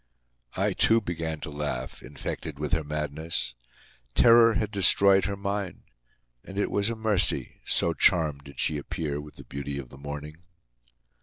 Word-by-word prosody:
I, - - +1
too, 115 0 +5
began 80 -5 -4
to 75 - -6
laugh, 70 -3 -4
infected 70 +2 -6
with 75 0 -3
her 80 +1 +1
madness. 75 -1 -3 0.6
Terror 115 -1 +7
had 105 -1 -1
destroyed 100 -1 +5
her 100 -1 -2
mind; 100 -2 -3 0.6
and 95 - -9
it 100 - 0
was 100 +2 +1
a 115 - -2
mercy, 110 -4 0
so 85 - +2
charmed 75 -3 +2
did 70 - -11
she 75 -2 +1
appear 75 0 -3
with 75 0 -12
the - - -11
beauty 70 0 -5
of 65 -3 -7
the 70 - -13
morning. 75 +2 -7
80 Hz, 160 wpm, -27 LUFS, 75-100 Hz, 0.6 s, Terror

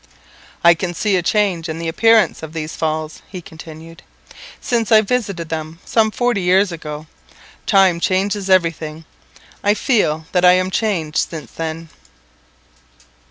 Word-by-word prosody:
"I 170 0 +8
can 175 +1 -4
see 205 +2 +1
a 180 - +2
change 180 -3 0
in 160 - -4
the 165 0 -4
appearance 225 +6 +3
of 160 0 -8
these 155 -1 -5
Falls," 155 -1 -3
he 185 - -7
continued, 160 0 -12 0.6
"since 235 -2 -1
I 215 -1 +7
visited 200 -7 -2
them 160 0 -5
some 220 -1 +2
forty 240 -2 0
years 185 +2 +3
ago. 155 -2 -7 0.6
Time 190 -5 +4
changes 195 +2 0
everything; 165 -3 0 0.6
I 205 +1 +3
feel 160 - +1
that 180 -1 +1
I 180 0 +7
am 185 +1 +1
changed 180 -9 -1
since 160 -3 -8
then. 165 0 -5
175 Hz, 145 wpm, -18 LUFS, 160-200 Hz, 0.6 s, I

